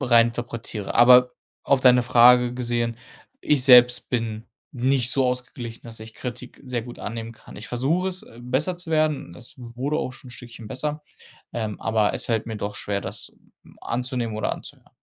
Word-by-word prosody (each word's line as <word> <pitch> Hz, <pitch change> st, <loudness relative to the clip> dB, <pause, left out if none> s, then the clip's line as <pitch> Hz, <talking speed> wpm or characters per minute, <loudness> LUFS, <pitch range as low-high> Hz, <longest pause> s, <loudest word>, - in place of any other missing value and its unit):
rein 120 Hz, -3 st, +5 dB
interpretiere. 115 Hz, -3 st, -5 dB
Aber 125 Hz, +1 st, +7 dB, 0.3 s
auf 140 Hz, -2 st, +3 dB
deine 125 Hz, -1 st, +5 dB
Frage 125 Hz, 0 st, +6 dB
gesehen, 120 Hz, -2 st, -1 dB, 0.4 s
ich 140 Hz, -4 st, +2 dB
selbst 125 Hz, -2 st, +7 dB
bin 115 Hz, -2 st, -3 dB, 0.2 s
nicht 130 Hz, -1 st, +1 dB
so 135 Hz, -1 st, +2 dB
ausgeglichen, 125 Hz, -2 st, -4 dB
dass 115 Hz, -2 st, -7 dB
ich 110 Hz, 0 st, -10 dB
Kritik 125 Hz, 0 st, -8 dB
sehr 125 Hz, -2 st, -3 dB
gut 120 Hz, +1 st, -10 dB
annehmen 115 Hz, +1 st, -5 dB
kann. 110 Hz, -, -15 dB
Ich 105 Hz, -, -8 dB
versuche 150 Hz, +10 st, 0 dB
es 185 Hz, 0 st, -4 dB
besser 130 Hz, +9 st, -1 dB
zu 175 Hz, -2 st, -6 dB
werden 155 Hz, -2 st, +1 dB
und 85 Hz, -, -13 dB
es 120 Hz, -, -9 dB
wurde 125 Hz, +5 st, -3 dB
auch 130 Hz, -, -3 dB
schon 130 Hz, -, -14 dB
'n -, -, -11 dB
Stückchen 120 Hz, -3 st, -10 dB
besser, 150 Hz, +4 st, -4 dB, 0.5 s
ähm, 110 Hz, -3 st, -4 dB
aber 110 Hz, -2 st, +1 dB
es -, -, -4 dB
fällt 115 Hz, -1 st, -1 dB
mir 110 Hz, -2 st, -5 dB
doch 105 Hz, 0 st, -5 dB
schwer, 100 Hz, -1 st, -3 dB
das 100 Hz, +2 st, -4 dB, 0.3 s
m -, -, -19 dB
anzunehmen 120 Hz, -2 st, -2 dB
oder 110 Hz, -, -1 dB
anzuhören. -, -, -10 dB
120 Hz, 185 wpm, -24 LUFS, 115-130 Hz, 0.5 s, Aber